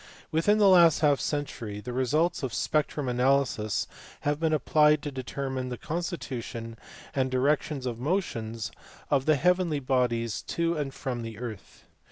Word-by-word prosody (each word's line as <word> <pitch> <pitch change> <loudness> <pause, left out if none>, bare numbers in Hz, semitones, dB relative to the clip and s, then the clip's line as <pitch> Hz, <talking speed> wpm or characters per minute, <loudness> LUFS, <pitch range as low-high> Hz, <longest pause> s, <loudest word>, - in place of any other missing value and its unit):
Within 170 +7 +3
the 210 -2 +5
last 170 -5 +6
half 145 -3 +4
century 120 -8 -3
the 120 +4 -6
results 150 +7 +1
of 130 -4 -3
spectrum 150 -2 0
analysis 125 -4 +1 0.4
have 145 0 0
been 160 -1 +1
applied 150 0 +4
to 145 - -3
determine 130 0 -4
the 125 - -4
constitution, 130 -9 -4 0.4
and 130 -1 +1
directions 135 +1 0
of 120 -2 -3
motions 115 - -2 0.4
of 135 -1 +2
the 155 - +5
heavenly 180 0 +2
bodies 125 -4 0
to 170 0 -1
and 145 -3 -2
from 125 -3 -4
the 115 -2 -7
earth. 115 -5 -8
135 Hz, 150 wpm, -28 LUFS, 125-155 Hz, 0.4 s, last